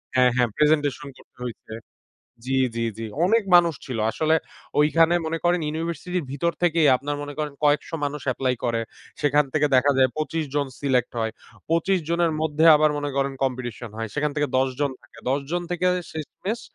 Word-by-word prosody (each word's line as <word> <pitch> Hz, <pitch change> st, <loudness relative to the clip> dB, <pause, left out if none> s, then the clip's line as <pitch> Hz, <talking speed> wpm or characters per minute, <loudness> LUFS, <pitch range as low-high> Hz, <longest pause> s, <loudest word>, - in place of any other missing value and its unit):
হ্যাঁ, 125 Hz, -1 st, +5 dB
হ্যাঁ, 125 Hz, -2 st, +2 dB
প্রেজেন্টেশন 150 Hz, -1 st, +1 dB
করতে -, -, -21 dB
হইছে 115 Hz, -2 st, -8 dB, 0.7 s
জি, 135 Hz, -, 0 dB, 0.2 s
জি, 115 Hz, 0 st, -1 dB
জি, 115 Hz, -, -4 dB, 0.2 s
অনেক 225 Hz, +4 st, +3 dB
মানুষ 170 Hz, -2 st, +6 dB
ছিল 125 Hz, -4 st, -4 dB
আসলে 155 Hz, +4 st, +1 dB, 0.5 s
ওইখানে 165 Hz, +3 st, +4 dB
মনে 165 Hz, +1 st, -2 dB
করেন 175 Hz, 0 st, +3 dB
ইউনিভার্সিটির 165 Hz, +2 st, -3 dB
ভিতর 170 Hz, +5 st, 0 dB
থেকেই 165 Hz, -3 st, +4 dB
আপনার 145 Hz, +2 st, -4 dB
মনে 145 Hz, 0 st, -7 dB
করেন 150 Hz, -1 st, -2 dB
কয়েকশো 150 Hz, +2 st, +2 dB
মানুষ 145 Hz, +1 st, -3 dB
এপ্লাই 130 Hz, 0 st, 0 dB
করে। 115 Hz, -1 st, 0 dB, 0.4 s
সেখান 145 Hz, 0 st, +3 dB
থেকে 150 Hz, -1 st, +2 dB
দেখা 140 Hz, +3 st, +4 dB
যায় 130 Hz, 0 st, +5 dB
২৫ 155 Hz, +1 st, -1 dB
জন 145 Hz, -1 st, +1 dB
সিলেক্ট 130 Hz, -3 st, +1 dB
হয় 110 Hz, 0 st, -1 dB, 0.4 s
২৫ 175 Hz, +3 st, +2 dB
জনের 170 Hz, -1 st, +2 dB
মধ্যে 155 Hz, 0 st, +1 dB
আবার 155 Hz, 0 st, +3 dB
মনে 145 Hz, 0 st, -2 dB
করেন 140 Hz, 0 st, +1 dB
কম্পিটিশন 120 Hz, -3 st, -4 dB
হয়। 115 Hz, 0 st, -3 dB
সেখান 150 Hz, 0 st, 0 dB
থেকে 145 Hz, -1 st, +1 dB
১০ 135 Hz, 0 st, +2 dB
জন 145 Hz, -1 st, +1 dB
থাকে -, -, -19 dB
১০ 140 Hz, +2 st, +1 dB
জন 175 Hz, +1 st, -1 dB
থেকে 175 Hz, +1 st, 0 dB, 0.3 s
শেষমেষ 185 Hz, +8 st, -5 dB
150 Hz, 180 wpm, -24 LUFS, 135-165 Hz, 0.7 s, মানুষ